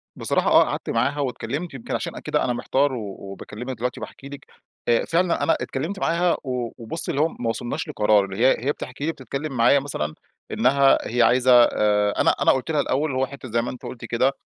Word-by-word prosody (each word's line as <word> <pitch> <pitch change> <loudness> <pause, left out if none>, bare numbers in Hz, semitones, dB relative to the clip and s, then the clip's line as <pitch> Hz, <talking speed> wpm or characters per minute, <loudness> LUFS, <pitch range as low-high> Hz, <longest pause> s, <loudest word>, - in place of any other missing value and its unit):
بصراحة - - 0
آه، - - +7
قعدت - - -4
معاها 145 - 0
واتكلمت 140 +4 -3
يمكن 130 - -5
عشان - - -4
كده - - -1
أنا 125 - 0
محتار 135 +3 +1
و 105 -5 -5
وباكلّمك 105 +6 -7
دلوقتي 125 +3 -3
باحكي 140 - -9
لك، 140 - -10 0.4
آآ 120 -1 +3
فعلًا 170 +1 +1
أنا - - +3
اتكلّمت 165 +9 -4
معاها 170 +1 +1
و 125 -3 -3
وبُصّي 145 +9 -3
اللي 145 - 0
هو 160 - +4
ما 120 -7 -4
وصلناش 120 +1 -3
لقرار، 105 -1 +3
اللي 95 0 -7
هي 130 -2 +3
هي 145 - +2
بتحكي 140 0 -6
لي 165 - +1
بتتكلّم 140 +1 -6
معايا 120 +5 +5
مثلًا 80 - -4 0.4
إنّها 135 +3 +4
هي 120 +1 +1
عايزة 125 +2 +4
آآ، 105 -2 +2
أنا - - +5
أنا - - +5
قُلت 130 +4 -1
لها 150 -2 +2
الأوّل، 145 +4 0
اللي 130 -2 -2
هو - - +3
حتة- 135 -2 -10
زي 115 +1 +2
ما 120 - -4
أنتِ 125 - -11
قلتِ 120 - -7
كده- 130 +3 +1
130 Hz, 215 wpm, -23 LUFS, 115-140 Hz, 0.4 s, آه